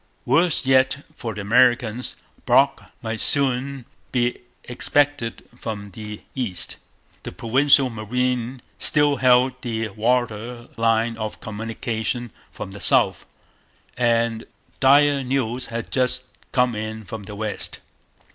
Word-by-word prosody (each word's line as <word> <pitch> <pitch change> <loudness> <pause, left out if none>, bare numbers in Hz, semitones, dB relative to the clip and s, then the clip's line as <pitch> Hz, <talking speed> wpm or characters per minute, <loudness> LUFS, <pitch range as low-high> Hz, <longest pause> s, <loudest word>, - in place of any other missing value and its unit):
Worse 155 +3 +3
yet 130 +2 +3
for 115 -7 -5
the 105 - -4
Americans, 120 +2 +2 0.3
Brock - - +3
might 110 0 -3
soon 135 -1 0 0.3
be 120 -1 0 0.2
expected 135 -1 0
from 105 -4 -6
the 105 +1 -8
east; 110 -10 -3 0.4
the - - -7
Provincial 135 +7 +4
Marine 125 +3 -2 0.2
still 145 -1 +3
held 125 0 +3
the 115 -2 -2
water 120 +2 -1
line 115 0 +1
of 110 -1 -5
communication 115 +2 -4 0.2
from - - -7
the 100 - -9
south; - - +3 0.7
and 115 -2 +1 0.3
dire 140 +1 +5
news 125 -2 -1
had 115 0 -5
just 125 0 +1 0.2
come 125 -2 +2
in 110 0 -5
from 105 +1 -7
the 105 - -8
west. 105 0 -4
120 Hz, 120 wpm, -23 LUFS, 110-130 Hz, 0.7 s, dire